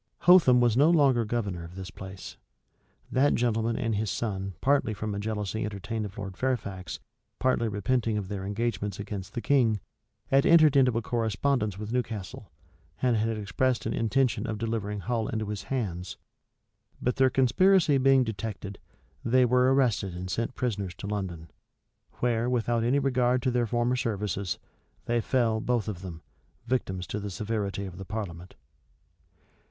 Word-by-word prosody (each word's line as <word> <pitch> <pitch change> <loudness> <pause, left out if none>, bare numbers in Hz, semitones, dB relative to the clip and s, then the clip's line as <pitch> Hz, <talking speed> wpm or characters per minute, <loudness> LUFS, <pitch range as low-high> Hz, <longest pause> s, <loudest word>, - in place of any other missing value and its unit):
Hotham 170 -9 +7
was 120 -2 +3
no 145 +5 +5
longer 135 -8 +4
governor 105 -6 -2
of 85 +2 -10
this 95 +1 -7
place. 95 -1 -9 0.8
That 140 +3 +3
gentleman 115 -1 +1
and 115 -1 -1
his 105 0 -1
son 95 -4 -3
partly 135 -6 +2
from 105 +1 -3
a 100 - -3
jealousy 105 0 -3
entertained 105 +2 -4
of 100 +2 -9
Lord 95 -2 -6
Fairfax, 100 -7 -3 0.4
partly 130 -3 +1
repenting 110 +2 0
of 100 -3 -3
their 100 -1 -4
engagements 105 -1 -2
against 100 -2 -6
the 120 - -2
king, 120 -7 +3 0.5
had 135 +1 +5
entered 155 -4 +6
into 125 -4 +4
a 115 - -1
correspondence 110 -1 0
with 105 +1 -6
Newcastle, 110 -5 -4 0.5
and 125 -2 +2
had 110 0 0
expressed 115 +5 0
an 110 - -1
intention 120 +3 +1
of 110 -1 -3
delivering 105 -2 -3
Hull 115 -1 -1
into 110 -1 -2
his 105 -2 -3
hands. 95 -9 -3 0.8
But 125 - -1
their 130 -1 +5
conspiracy 150 +4 +4
being 135 0 +5
detected, 105 -3 -5 0.4
they 125 +2 +4
were 125 +1 +4
arrested 115 -9 +1
and 90 +1 -5
sent 115 +6 -2
prisoners 100 -8 -2
to - - -8
London; 90 -6 -4 0.6
where, 120 0 0
without 120 -1 +1
any 125 +4 +2
regard 125 -3 +2
to 130 - +2
their 120 -1 +1
former 120 +2 +1
services, 100 -6 -2 0.5
they 120 0 +1
fell, 115 -3 +1
both 120 -2 0
of 95 -5 -4
them, 85 -4 -8 0.4
victims 95 -7 -1
to 105 - -4
the 105 0 -5
severity 100 0 -3
of 90 -1 -9
the 95 - -6
parliament. 95 -5 -6
110 Hz, 160 wpm, -28 LUFS, 100-125 Hz, 0.8 s, Hotham